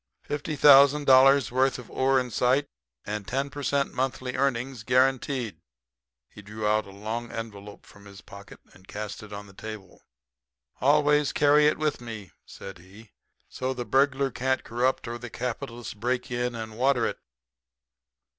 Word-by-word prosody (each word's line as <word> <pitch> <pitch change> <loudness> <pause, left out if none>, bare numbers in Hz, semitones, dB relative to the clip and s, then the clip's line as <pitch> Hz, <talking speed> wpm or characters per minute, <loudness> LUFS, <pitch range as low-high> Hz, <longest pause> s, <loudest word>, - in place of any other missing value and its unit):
"Fifty 145 +1 -4
thousand 140 +1 +6
dollars' 135 -1 +6
worth 130 +1 +2
of 125 - -12
ore 135 0 +2
in 125 -1 -4
sight, 130 +5 +1 0.4
and 105 -1 -5
10 135 +2 -2
per 145 0 -7
cent. 140 0 0
monthly 130 -1 -3
earnings 130 -2 -1
guaranteed." 130 -1 0 0.7
He - - -14
drew 105 +1 -7
out 105 0 +1
a - - -11
long 110 +4 -5
envelope 105 -3 -8
from 100 0 -17
his 100 -1 -12
pocket 100 0 -13
and 95 +1 -20
cast 105 -1 -6
it 105 -1 -12
on 100 0 -7
the 100 - -16
table. 105 -2 -10 0.8
"Always 150 +1 +3
carry 150 +1 +4
it 150 - +1
with 155 -4 -1
me," 110 -6 -8 0.2
said 95 -2 -10
he. 100 +5 -16 0.4
"So 130 +1 -4
the 120 -1 -5
burglar 135 +1 +2
can't 130 +2 -1
corrupt 125 +2 -1
or 120 +1 -5
the 120 0 -8
capitalist 120 -2 -6
break 125 +2 -2
in 120 0 -2
and 110 0 -7
water 130 -2 +2
it." - - -3
125 Hz, 165 wpm, -26 LUFS, 110-135 Hz, 0.8 s, thousand